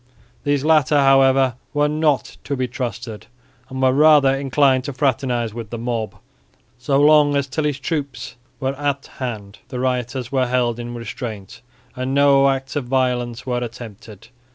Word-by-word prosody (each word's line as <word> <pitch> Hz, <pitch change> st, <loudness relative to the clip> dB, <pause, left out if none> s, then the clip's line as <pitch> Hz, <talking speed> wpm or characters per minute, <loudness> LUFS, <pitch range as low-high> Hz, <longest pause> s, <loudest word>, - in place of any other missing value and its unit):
These 145 Hz, -1 st, 0 dB
latter, 155 Hz, -2 st, +4 dB
however, 135 Hz, -2 st, +4 dB, 0.2 s
were 145 Hz, 0 st, +3 dB
not 150 Hz, -2 st, 0 dB
to 140 Hz, -, -2 dB
be 130 Hz, 0 st, -1 dB
trusted 120 Hz, -3 st, -6 dB, 0.4 s
and 130 Hz, 0 st, -4 dB
were 130 Hz, 0 st, +4 dB
rather 145 Hz, -2 st, +5 dB
inclined 135 Hz, -1 st, +2 dB
to 140 Hz, -, -4 dB
fraternise 125 Hz, -4 st, -1 dB
with 115 Hz, -2 st, -7 dB
the 120 Hz, -, -5 dB
mob. 115 Hz, -2 st, -3 dB, 0.6 s
So 135 Hz, +3 st, +1 dB
long 145 Hz, 0 st, +5 dB
as 140 Hz, -1 st, +1 dB
Tilly's 145 Hz, +1 st, -2 dB
troops 135 Hz, -4 st, -4 dB, 0.2 s
were 135 Hz, -1 st, -1 dB
at 140 Hz, -1 st, -2 dB
hand, 110 Hz, -6 st, -6 dB
the 125 Hz, -, -6 dB
rioters 125 Hz, 0 st, -2 dB
were 130 Hz, -2 st, +1 dB
held 120 Hz, -1 st, 0 dB
in 120 Hz, 0 st, -6 dB
restraint 115 Hz, -4 st, -7 dB, 0.3 s
and 130 Hz, +1 st, -3 dB
no 140 Hz, -1 st, +5 dB
acts 135 Hz, +1 st, -3 dB
of 145 Hz, -4 st, -2 dB
violence 125 Hz, -2 st, -1 dB
were 125 Hz, -2 st, -1 dB
attempted. 110 Hz, -3 st, -9 dB
130 Hz, 155 wpm, -20 LUFS, 120-140 Hz, 0.6 s, rather